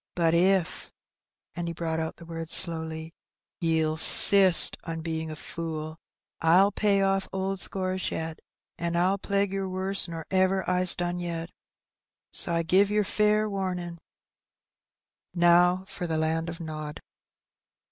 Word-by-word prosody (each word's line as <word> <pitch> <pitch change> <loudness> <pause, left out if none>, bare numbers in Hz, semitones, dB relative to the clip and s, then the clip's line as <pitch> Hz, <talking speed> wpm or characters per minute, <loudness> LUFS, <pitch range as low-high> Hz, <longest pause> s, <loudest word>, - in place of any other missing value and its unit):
But 165 -2 +1
if," 180 0 0 0.6
and 175 -1 -6
he 170 - -6
brought 160 -1 -4
out 160 0 -5
the 170 - -14
words 165 -1 -6
slowly, 160 -1 -1 0.5
*'ye'll 160 -2 0
'sist 190 +2 +7
on 165 -1 -6
bein' 160 -1 -5
a 155 - -7
fool, 155 0 -7 0.4
I'll 180 +5 +4
pay 200 -2 0
off 195 0 -1
old 190 0 -4
scores 185 -1 -2
yet, 160 0 -6 0.4
and 170 0 -2
I'll 185 +3 0
plague 200 0 -2
yer 195 -1 -3
worse 190 +1 0
nor 165 -2 -8
ever 190 0 0
I's 180 0 +4
done 175 0 -4
yet! 170 -1 -6 0.8
so - - +1
I 170 0 -1
give 190 +5 +2
yer 210 0 0
fair 210 +1 0
wamin'. 180 -4 -5 1.4
Now 175 +2 +3
for 180 - -6
the 160 -1 -2
land 160 +1 -2
o' 170 - -6
nod." 155 -1 -7
175 Hz, 145 wpm, -26 LUFS, 165-190 Hz, 1.4 s, sist